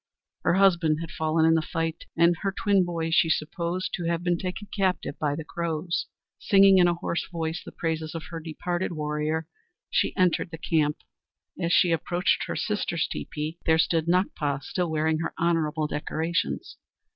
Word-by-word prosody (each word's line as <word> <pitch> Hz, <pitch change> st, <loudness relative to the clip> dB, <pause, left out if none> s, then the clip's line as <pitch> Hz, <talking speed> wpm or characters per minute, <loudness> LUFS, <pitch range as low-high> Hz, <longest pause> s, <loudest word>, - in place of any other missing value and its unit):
Her -, -, +2 dB
husband 170 Hz, -5 st, +4 dB
had 165 Hz, -1 st, -6 dB
fallen 160 Hz, 0 st, +1 dB
in 160 Hz, -, +5 dB
the 160 Hz, -, +3 dB
fight, 165 Hz, 0 st, -3 dB
and 170 Hz, +1 st, +5 dB
her 195 Hz, -, 0 dB
twin 195 Hz, -1 st, +2 dB
boys 165 Hz, -2 st, -2 dB
she 165 Hz, -, +4 dB
supposed 170 Hz, +4 st, -1 dB
to 175 Hz, -, -3 dB
have 170 Hz, 0 st, -1 dB
been 175 Hz, -1 st, +2 dB
taken 185 Hz, +3 st, -5 dB
captive 190 Hz, -7 st, 0 dB
by 145 Hz, -2 st, 0 dB
the 160 Hz, -, -5 dB
Crows. 170 Hz, +1 st, -2 dB, 0.3 s
Singing 195 Hz, -1 st, +6 dB
in 175 Hz, -, +6 dB
a 175 Hz, -, +2 dB
hoarse 170 Hz, 0 st, -3 dB
voice 165 Hz, 0 st, -3 dB
the -, -, -9 dB
praises 160 Hz, -1 st, -3 dB
of 165 Hz, -, -4 dB
her 165 Hz, -, -4 dB
departed 175 Hz, +3 st, -3 dB
warrior, 150 Hz, +1 st, -2 dB, 0.4 s
she -, -, +1 dB
entered 180 Hz, -2 st, +2 dB
the 165 Hz, -, -7 dB
camp. 155 Hz, -2 st, 0 dB, 0.6 s
As 170 Hz, 0 st, 0 dB
she 180 Hz, -1 st, +5 dB
approached 175 Hz, +3 st, +1 dB
her -, -, -3 dB
sister's 190 Hz, -6 st, -1 dB
teepee, 155 Hz, +2 st, -5 dB
there 160 Hz, 0 st, +5 dB
stood 160 Hz, 0 st, +2 dB
Nakpa, 150 Hz, -6 st, 0 dB
still 180 Hz, -2 st, -2 dB
wearing 160 Hz, 0 st, +1 dB
her 165 Hz, -, -3 dB
honorable 160 Hz, -2 st, +1 dB
decorations. 160 Hz, +5 st, -2 dB
165 Hz, 175 wpm, -26 LUFS, 160-175 Hz, 0.6 s, Singing